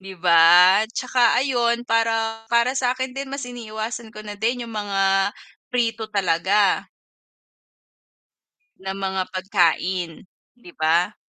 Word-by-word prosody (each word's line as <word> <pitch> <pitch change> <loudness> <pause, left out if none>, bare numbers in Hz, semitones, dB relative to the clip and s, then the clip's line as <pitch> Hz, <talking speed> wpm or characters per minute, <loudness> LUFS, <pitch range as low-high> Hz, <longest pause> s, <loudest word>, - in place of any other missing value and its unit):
'Di 190 0 -10
ba, 175 +3 +6
'tsaka 250 0 +1
ayun 240 -2 0
para 225 -1 -1
para 235 +2 +2
sa'kin 255 0 -1
din 270 0 -6
mas 275 0 -5
iniiwasan 230 -1 -7
ko 215 - -9
na 210 - -7
din 240 +2 -1
'yung 230 - -10
mga 195 -2 0 0.4
prito 230 -3 -1
talaga. 195 0 +1 2.0
Na 190 - -5
mga 190 -1 -2
pagkain, 185 -2 -1 0.3
'di 180 -7 -15
ba? 170 +6 +1
215 Hz, 115 wpm, -22 LUFS, 190-235 Hz, 2.0 s, ba